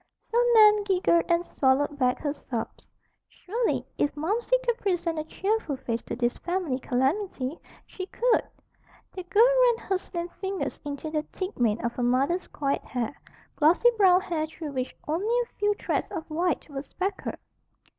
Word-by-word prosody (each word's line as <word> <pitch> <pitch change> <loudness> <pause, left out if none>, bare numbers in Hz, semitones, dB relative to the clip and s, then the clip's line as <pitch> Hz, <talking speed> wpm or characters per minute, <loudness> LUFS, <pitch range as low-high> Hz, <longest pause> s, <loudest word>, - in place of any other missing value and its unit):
So - - -9 0.2
Nan 425 -1 +7
giggled 365 -4 +2
and 340 +1 +2
swallowed 285 +1 +1
back 250 -1 +2
her 290 -2 -1
sobs. 240 -6 -6 0.4
Surely, 450 +4 -2
if 290 - +2
Momsey 440 +10 +1
could 475 -1 0
present 345 -4 -1
a - - -2
cheerful 385 -3 -1
face 235 -3 -3
to - - -4
this 240 0 0
family 345 -7 -1
calamity, 270 +3 -1 0.3
she 370 -1 -7
could! 485 +3 +2 0.7
The 375 - -5
girl 410 +6 +4
ran - - +3
her 380 -1 +1
slim 345 -1 -5
fingers 385 +1 -4
into 290 +1 -5
the 305 -1 0
thick 375 -4 -5
mane 230 -1 +1
of 235 - 0
her 250 - -4
mother's 270 +9 +1
coiled 280 -1 -1
hair, 245 0 -3 0.4
glossy 340 +10 +5
brown 375 -3 +5
hair 330 -5 -2
through 315 -1 -7
which 255 -2 -3
only 410 +10 +1
a 475 - -7
few 415 0 +2
threads - - -1
of 335 -5 -6
white 345 +3 0
were 280 -3 -5
speckled. 375 +7 -4
340 Hz, 165 wpm, -27 LUFS, 280-400 Hz, 0.7 s, Nan